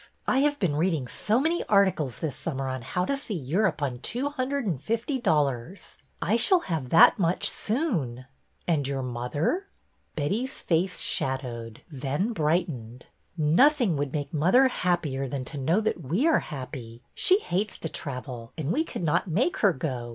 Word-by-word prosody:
I 260 - +2
have 290 +1 +2
been 175 - 0
reading 160 -6 0
so 210 - +1
many 325 +5 +1
articles 190 - +2
this 150 -5 -3
summer 135 -1 -4
on 130 -1 -3
how 180 +10 -2
to 280 - 0
see 275 -7 -4
Europe 165 +3 0
on 125 -3 -2
two 250 - -2
hundred 280 -1 -2
and 160 -10 -2
fifty 230 - -1
dol 160 -11 +3
lars. 140 +7 -6 0.2
I 220 - +2
shall 360 - +4
have 160 - -3
that 165 +7 +7
much 175 -1 +1
soon." 175 - -1 0.2
" - - -40
And 150 -6 +1
your 135 -1 -2
mother? 130 - -2 0.2
" - - -43
Betty's 210 - -2
face 180 +2 0
shadowed, 120 -4 -2
then 145 - -2
brightened. 150 - -1 0.3
" - - -36
Nothing 190 - +4
would 140 -1 -2
make 145 0 -4
mother 185 - +4
happier 165 - -1
than 130 0 -4
to 145 +2 -6
know 160 +9 +2
that 215 -5 -1
we 175 - +1
are 325 - +4
happy. 125 -4 -8
She 375 - +4
hates 205 - -2
to - - -4
travel, 125 -5 -6
and 155 0 -2
we 310 - +2
could 250 - -6
not 160 +5 +1
make 245 - +1
her 205 - +4
go. 130 -6 -4
160 Hz, 180 wpm, -27 LUFS, 135-215 Hz, 0.3 s, that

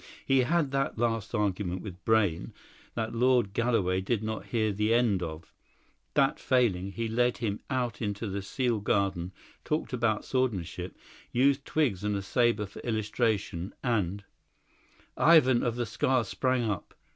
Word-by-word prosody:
He 135 0 +4
had 150 +2 +2
that 135 -3 -1
last 115 -1 -1
argument 95 -3 -1
with 95 -3 -9
Brayne, 105 -7 +1 0.4
that 110 -1 -2
Lord 120 -4 +2
Galloway 100 -6 +1
did 110 +2 -1
not 110 0 -4
hear 110 -3 +1
the 105 +3 +2
end 115 -6 +2
of; 80 -1 -7 0.6
that - - +3
failing, 100 -7 +1
he 115 +2 -2
led 120 +2 +1
him 105 -3 -2
out 125 -4 -2
into 105 0 -2
the 100 0 -3
sealed 115 +2 -1
garden, 95 -4 0 0.3
talked 155 -3 -2
about 115 -3 0
swordsmanship, 95 -9 -2 0.3
used 135 +2 +2
twigs 120 -12 0
and 105 0 0
a 100 - -3
sabre 115 0 +2
for 100 - -11
illustration, 110 -5 -1
and 100 -5 0 0.5
" - - -33 0.2
Ivan 130 -6 +5
of 120 -1 -1
the 120 -1 -1
Scar 130 +3 +1
sprang 130 +3 0
up. 105 -5 -3
110 Hz, 155 wpm, -29 LUFS, 100-125 Hz, 0.6 s, Ivan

